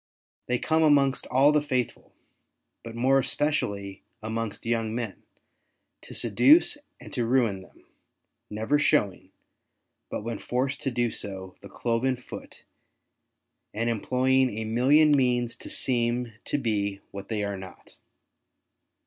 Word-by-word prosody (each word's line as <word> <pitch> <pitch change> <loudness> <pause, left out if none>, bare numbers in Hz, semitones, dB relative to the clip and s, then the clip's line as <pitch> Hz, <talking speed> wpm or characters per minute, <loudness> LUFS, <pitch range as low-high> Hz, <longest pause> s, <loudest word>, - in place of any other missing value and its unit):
They 125 - +1
come 160 +5 +1
amongst 140 -4 +3
all 135 +3 +4
the 150 0 +3
faithful, 130 -4 -3 0.7
but 115 0 -8
more 130 +3 +3
especially 100 -10 -1 0.2
amongst 110 -1 -4
young 115 -1 -1
men, 115 -5 -4 0.8
to - - -10
seduce 290 - +4 0.2
and - - -12
to 120 - 0
ruin 115 -5 +1
them, 95 - -19 0.6
never 110 +8 0
showing, 125 -11 +1 0.8
but - - -4
when 115 -1 -4
forced 130 +3 -2
to - - -1
do 120 -2 0
so, 95 -2 -6
the - - -11
cloven 120 +3 0
foot, 125 - -11 1.1
and 115 +2 0
employing 130 +1 +1
a 110 - -3
million 135 +7 +4
means 125 -4 +2
to - - -9
seem 120 -1 0
to - - -1
be 100 -6 -1
what 100 0 -8
they 105 -2 -1
are 100 0 -2
not. 95 -1 -12
120 Hz, 130 wpm, -26 LUFS, 110-130 Hz, 1.1 s, all